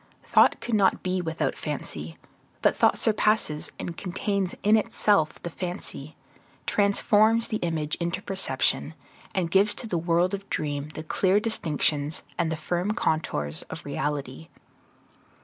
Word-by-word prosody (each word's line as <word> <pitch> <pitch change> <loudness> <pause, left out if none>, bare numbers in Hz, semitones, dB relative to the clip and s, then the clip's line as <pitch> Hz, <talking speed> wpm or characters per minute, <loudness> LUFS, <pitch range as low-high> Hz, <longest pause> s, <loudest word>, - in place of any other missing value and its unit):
Thought - - +4
could 240 - -4
not 200 -3 +3
be 185 0 0
without 160 -2 -1
fancy; 80 - -5 0.5
but - - +4
thought - - +4
surpasses 210 -8 +1
and 170 - -5
contains 195 +1 -2
in 210 +2 +6
itself 210 -6 +2
the 175 - -4
fancy, 180 +2 -6 0.5
transforms 215 +2 +3
the 220 - 0
image 160 -5 -2
into 170 +2 -2
perception, 195 -1 -1 0.4
and 175 -3 0
gives 200 +3 +4
to - - -6
the 180 -6 -1
world 170 +3 +2
of 200 0 -5
dream 145 -1 -2
the 155 - -5
clear 190 +5 +2
distinctions 155 -8 0 0.2
and 165 -2 +1
the - - 0
firm 175 +6 -1
contours 80 - -1
of 160 - -7
reality. 145 0 -3
175 Hz, 140 wpm, -26 LUFS, 155-200 Hz, 0.5 s, in